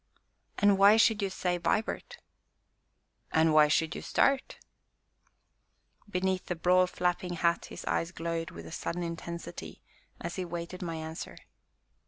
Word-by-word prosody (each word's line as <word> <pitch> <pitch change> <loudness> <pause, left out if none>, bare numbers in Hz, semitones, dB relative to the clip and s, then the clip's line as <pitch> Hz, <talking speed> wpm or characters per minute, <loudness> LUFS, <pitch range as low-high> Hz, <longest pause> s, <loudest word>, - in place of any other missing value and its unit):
"And 200 -1 +4
why 200 +2 +8
should 220 -1 +4
you 200 - 0
say 180 -1 -1
'Vibart'?" 220 - -1 1.1
"And 160 0 +4
why 155 -1 +7
should 160 +2 +1
you - - -5
start?" 275 -1 +1 1.5
Beneath 185 -1 -1
the 180 - -1
broad, 180 +2 +3
flapping 180 0 -1
hat 170 0 +1
his - - -9
eyes 165 - 0
glowed 165 -1 -3
with 85 0 -10
a 80 - -9
sudden 175 +1 -3
intensity 170 0 -7 0.4
as - - -5
he 185 - -1
waited 175 +1 -6
my 170 -2 -3
answer. 160 +2 -6
175 Hz, 140 wpm, -30 LUFS, 165-185 Hz, 1.5 s, why